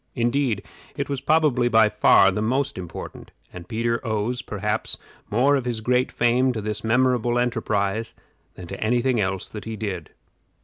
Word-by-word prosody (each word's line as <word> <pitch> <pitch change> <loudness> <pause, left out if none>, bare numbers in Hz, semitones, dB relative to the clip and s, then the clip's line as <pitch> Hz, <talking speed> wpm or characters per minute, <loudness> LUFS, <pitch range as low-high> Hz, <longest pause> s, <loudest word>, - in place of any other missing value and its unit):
Indeed, 120 -3 0 0.3
it 140 -1 -3
was 140 -2 -2
probably 145 -4 +3
by 110 -2 +5
far 95 -2 +5
the 105 - -2
most 130 0 -1
important, 90 -2 -8 0.2
and 90 -1 -9
Peter 115 +1 -1
owes, 115 +2 -1
perhaps, 105 -2 -3 0.3
more 130 +7 +3
of 135 -3 -1
his 120 -2 -2
great 125 +3 +1
fame 125 +2 +2
to 110 - -3
this 105 0 -4
memorable 120 0 +2
enterprise 110 -3 -1 0.4
than 90 - -9
to 85 - -6
any 120 +2 +1
thing 130 -4 +2
else 95 -1 -2
that 105 - -8
he 110 0 -4
did. 95 -7 -5
115 Hz, 170 wpm, -23 LUFS, 105-125 Hz, 0.4 s, by